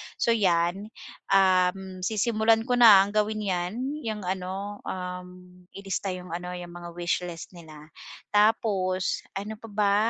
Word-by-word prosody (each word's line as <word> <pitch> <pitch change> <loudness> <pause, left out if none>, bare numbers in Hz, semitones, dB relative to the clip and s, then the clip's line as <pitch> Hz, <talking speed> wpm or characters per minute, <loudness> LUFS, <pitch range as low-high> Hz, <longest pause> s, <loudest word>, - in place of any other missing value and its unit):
so 235 - +1
'yan. 190 -2 +1 0.5
Um, 185 0 +2
sisimulan 220 +3 +2
ko 245 0 0
na 210 -5 +9
ang 200 - -5
gawin 215 0 0
'yan' 180 -1 -1 0.5
ano 190 +2 -4 1.0
ilista 195 -1 -3
'yong 180 -1 -9
ano, 180 +1 -5
'yong 175 -1 -8
mga 175 0 -9
wish 175 0 0
list 170 -1 -8
nila 160 -3 -13 0.4
tapos 205 -3 +2 0.2
ano 210 +2 -5
pa 225 - -11
ba 205 -1 +1
190 Hz, 130 wpm, -26 LUFS, 180-210 Hz, 1.0 s, na